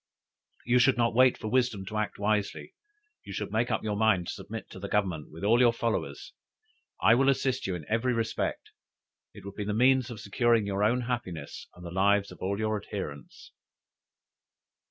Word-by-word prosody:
You 125 +1 +4
should 130 0 +4
not 115 -1 +2
wait 130 +1 +5
for - - -6
wisdom 115 -4 0
to 110 +3 -5
act 105 - -3
wisely; 105 0 -1 0.5
you - - -10
should - - -4
make - - 0
up - - -1
your 105 -1 -1
mind 100 -4 +2
to - - -4
submit - - -8
to - - -9
the - - -6
Government 95 -7 -1
with 80 +4 -10
all 115 +4 +4
your 120 -2 +6
followers. 115 -2 -3 0.7
I 110 - +7
will 135 +3 +4
assist 130 -3 0
you 95 - -2
in 80 -4 -7
every 115 +3 +1
respect, 115 -2 -2 0.6
it - - -12
would 100 - -7
be 105 - -4
the 105 0 -2
means 130 +1 +3
of 115 -3 -7
securing 115 +2 +2
your 100 0 -1
own 120 +4 +2
happiness 110 - -5
and 90 - -12
the 85 - -6
lives 100 +2 +2
of - - -12
all 100 +2 -1
your 110 -1 -1
adherents.'" 75 -9 -8
110 Hz, 195 wpm, -28 LUFS, 100-120 Hz, 0.7 s, I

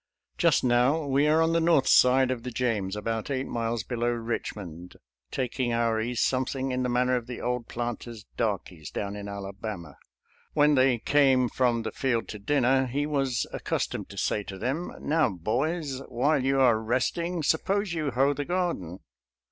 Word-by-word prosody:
Just - - +3
now 125 +5 +3
we 140 +1 +2
are 160 +2 +4
on 165 0 +1
the 165 - +3
north 165 -4 +3
side 130 0 +5
of 125 -2 -3
the 125 - -5
James, 110 -6 -1
about 110 +2 -3
eight 135 -1 -1
miles 115 -1 -2
below 120 -1 -1
Eichmond, 95 -7 -5 0.3
tak 130 0 -3
ing 125 -2 +1
onr 115 -1 +1
ease 120 +1 -2
something 130 +1 0
in 125 0 -1
the 125 - 0
manner 125 +1 +2
of 120 -1 -3
the 125 - -6
old 125 -1 -2
planter's 120 -2 -5
darkies 95 -8 -3
down 100 0 -4
in 100 0 -6
Alabama. 100 -4 -7 0.5
When 150 0 +4
they 130 -2 +4
came 130 -1 +3
from 120 -2 +1
the - - -3
field 125 -4 -1
to 105 - -6
dinner, 130 +3 +2
he 140 +4 -1
was 135 -5 0
accus - - -1
tomed - - -6
to - - -11
say 105 - 0
to 95 - -7
them, 135 - -2
" - - -12
Now, 160 +1 +2
boys, 130 - -2
while 135 +3 +1
you 135 +1 +2
are 120 -4 +5
resting, 160 +9 -1
suppose 195 +5 +1
you 155 -3 -1
hoe 135 +3 +2
the 145 - -3
garden." 170 - -2
125 Hz, 185 wpm, -27 LUFS, 115-140 Hz, 0.5 s, side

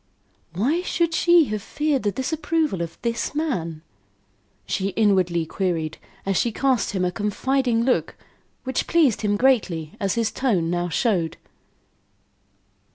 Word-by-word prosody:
"Why 265 - +1
should 340 -2 0
she 345 -1 +5
have 215 -1 -2
feared 295 +4 -1
the 205 - 0
disapproval 295 - -1
of 165 -1 -5
this 235 +3 -2
man?" 170 - -2 0.8
she 190 0 -1
inwardly 185 -6 +2
queried, 165 -3 -2 0.3
as 195 -1 +1
she 235 - +1
cast 255 -3 +1
him 185 -2 0
a 180 - 0
confiding 235 +4 0
look 255 +1 0 0.5
which 260 -1 -2
pleased 310 - +3
him 205 -1 +1
greatly, 200 - +1
as 195 -2 0
his 230 -2 0
tone 190 -11 0
now 175 0 -1
showed. 175 -4 0
215 Hz, 135 wpm, -23 LUFS, 180-270 Hz, 0.8 s, she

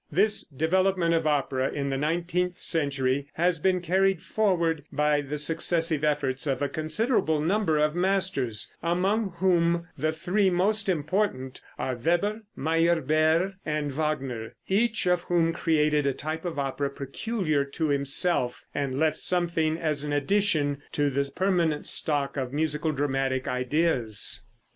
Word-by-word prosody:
This 200 +7 +2
development 170 +4 +1
of 165 -1 +1
opera 135 -3 0
in 140 -1 -3
the 135 - -1
nineteenth 175 +4 -1
century 140 -3 0
has 170 0 +1
been 185 +2 +1
carried 190 0 +1
forward 170 -8 0
by 150 0 +2
the 145 +1 -5
successive 160 0 +2
efforts 145 -2 0
of 135 -2 0
a - - +2
considerable 160 - 0
number 165 0 +1
of 150 0 +2
masters, 175 - 0
among 190 +4 0
whom 170 -2 +2
the 155 +1 0
three 185 +5 +1
most 200 +3 +1
important 155 -5 -1 0.2
are 130 - -2
Weber, 175 - 0 0.2
Meyerbeer 165 +3 +2
and 150 -2 -2
Wagner, 135 -6 -3
each 215 +1 +1
of 180 -1 +2
whom 165 -2 +2
created 150 -3 +1
a 140 - +1
type 155 +3 -5
of 170 -4 -4
opera 140 0 -1
peculiar 150 - -2
to 150 +3 -3
himself, 140 -1 +1
and 140 -2 -2
left 155 +1 +1
something 170 -3 0
as 155 -3 -2
an 150 - -3
addition 145 -3 +1
to 145 -1 +1
the 140 +1 -1
permanent 170 -5 +1
stock 145 -2 0
of 130 -2 -2
musical 150 +1 -1
dramatic 135 -2 -1
ideas. 125 -4 +1
155 Hz, 140 wpm, -26 LUFS, 140-180 Hz, 0.2 s, This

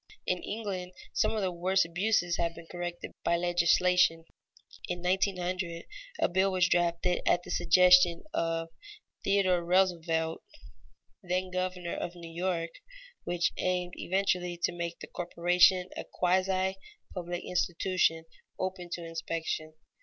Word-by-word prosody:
In 180 -1 0
England, 190 -4 -4 0.2
some - - +1
of 215 - -1
the 185 - 0
worst 185 +1 +2
abuses 175 0 +1
have 170 -1 -1
been 170 - -11
corrected 175 0 -6
by 170 - +2
legislation. 175 -1 +3 0.6
In 175 0 -4
1900, 180 -2 -1 0.3
a - - +3
bill 190 +2 +2
was 185 -1 +3
drafted 175 0 +1
at 175 - +3
the - - -8
suggestion 180 0 +5
of 165 0 -1 0.5
Theodore 190 -3 +2
Roosevelt, 170 -3 +1 0.8
then 185 0 -2
Governor 185 -1 -2
of 175 0 -4
New 170 -1 -10
York, 170 -1 -1 0.5
which 175 -1 +1
aimed 180 -1 -1
eventually 180 -2 0
to - - +3
make 170 -1 -4
the - - -8
corporation 180 +1 +3
a - - -4
quasi 185 +1 +1 0.4
public 175 -1 -4
institution, 175 -2 0 0.3
open 185 -1 -4
to 170 - -5
inspection. 165 -1 -4
175 Hz, 130 wpm, -30 LUFS, 170-185 Hz, 0.8 s, suggestion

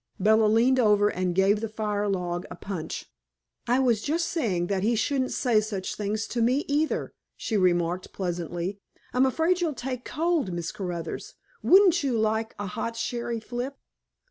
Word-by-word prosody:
Bella 220 +2 +4
leaned 240 +5 +4
over 210 -3 +4
and 180 -2 -1
gave 195 +2 +4
the 225 - -3
fire 210 -1 -2
log 180 -2 -2
a - - -7
punch. 175 -5 -5 0.6
"I 245 +2 +3
was 240 -5 +2
just 330 +6 0
saying 205 - 0
that 190 +1 -1
he 230 +4 +2
shouldn't 260 +3 0
say 235 -5 +2
such 205 -3 -4
things 215 +1 -2
to 240 - -1
me, 255 +5 +2
either," 300 +2 0 0.2
she 225 - -3
remarked 180 -2 +1
pleasantly. 175 +1 -3 0.3
"I'm 255 +2 +4
afraid 330 +7 +1
you'll 320 -5 0
take 255 0 -4
cold, 320 - 0
Miss 170 -1 -3
Caruthers. 175 -4 -5 0.3
Wouldn't 375 -2 +6
you 265 -5 0
like 220 +1 0
a 205 - -4
hot 230 +4 -4
sherry 235 0 -2
flip?" 245 +4 -5
220 Hz, 170 wpm, -26 LUFS, 190-255 Hz, 0.6 s, Wouldn't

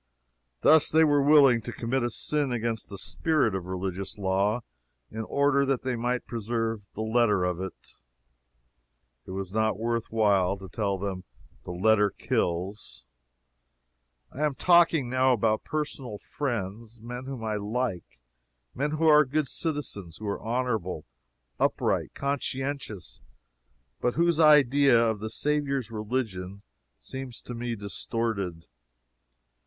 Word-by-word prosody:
Thus 155 -1 +6
they 160 +1 +5
were 145 -2 +4
willing 140 -5 +6
to 120 - -6
commit 120 +3 -1
a 120 - 0
sin 145 +3 -1
against 115 -2 -2
the 100 - -7
spirit 150 - +1
of 95 -2 -3
religious 95 +1 -4
law, 100 +4 +1 0.5
in 110 - -4
order 140 +1 +2
that 135 -2 0
they 130 -1 -1
might 120 +1 -1
preserve 115 -2 -3
the 110 - -3
letter 110 -4 +2
of 90 -1 -1
it. 95 -1 -8 1.3
It - - -11
was 95 0 -5
not 110 -1 +1
worth 115 +1 -2
while 100 -4 +2
to 95 0 -10
tell 100 +2 -1
them 95 -1 -4 0.4
"the - - -5
letter 105 +3 +3
kills." 90 -4 -3 1.3
I 145 - -4
am 150 -3 +1
talking 170 -6 +4
now 130 +1 +3
about 110 -1 +1
personal 140 -7 -4
friends; 115 -3 -4
men 125 +3 -7
whom 130 -4 -6
I 110 -1 -1
like; 105 - -3 0.5
men 145 +3 -1
who 160 +1 0
are 150 -1 +7
good 150 +1 -1
citizens; 130 - -3
who 110 - -8
are 100 - -3
honorable, 110 -9 -2 0.5
upright, - - 0
conscientious; 135 - -3 0.8
but 125 - 0
whose 170 0 +2
idea 140 -4 +6
of 110 -2 +1
the 110 +1 -4
Saviour's 140 -2 -1
religion 105 -4 -4 0.3
seems 130 -2 -7
to 120 - -8
me 120 0 -3
distorted. 100 -4 -3
115 Hz, 135 wpm, -27 LUFS, 100-135 Hz, 1.3 s, are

